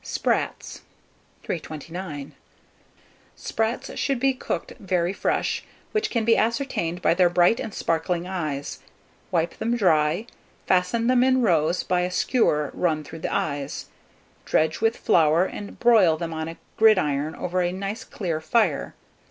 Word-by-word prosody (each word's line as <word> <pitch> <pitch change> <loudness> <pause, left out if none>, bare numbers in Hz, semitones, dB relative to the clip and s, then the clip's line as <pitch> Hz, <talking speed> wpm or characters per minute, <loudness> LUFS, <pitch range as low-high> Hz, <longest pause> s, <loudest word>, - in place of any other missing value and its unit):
SPRATS. - - -2 0.6
329. 160 -2 -6 1.0
Sprats 225 +2 -2
should 275 -3 0
be 270 +1 +3
cooked 255 - -4
very 180 -2 0
fresh, - - -1 0.3
which 430 0 0
can 230 -3 0
be 230 0 +5
ascertained 220 - -1
by - - +4
their 175 0 +4
bright 175 +5 +3
and 220 - -4
sparkling 170 0 -1
eyes. 155 -7 -4 0.5
Wipe 170 -1 -1
them 235 +2 0
dry; 165 -1 +2 0.4
fasten 185 +6 +2
them 250 0 +4
in 260 -1 +3
rows 170 -3 +2
by 180 -1 +1
a 180 - 0
skewer 165 - +1
run 155 -4 0
through 165 - -10
the - - -3
eyes; 145 -2 -3 0.5
dredge 155 +3 +1
with 225 +1 +2
flour, 160 +2 +3
and 205 +1 -8
broil 215 -9 +5
them 165 0 -4
on 160 0 -3
a 165 - -7 0.2
gridiron 155 -9 +3
over 180 +1 -1
a 175 0 0
nice 195 +4 -4
clear 170 -6 -4
fire. 180 -4 +1
180 Hz, 145 wpm, -24 LUFS, 160-225 Hz, 1.0 s, be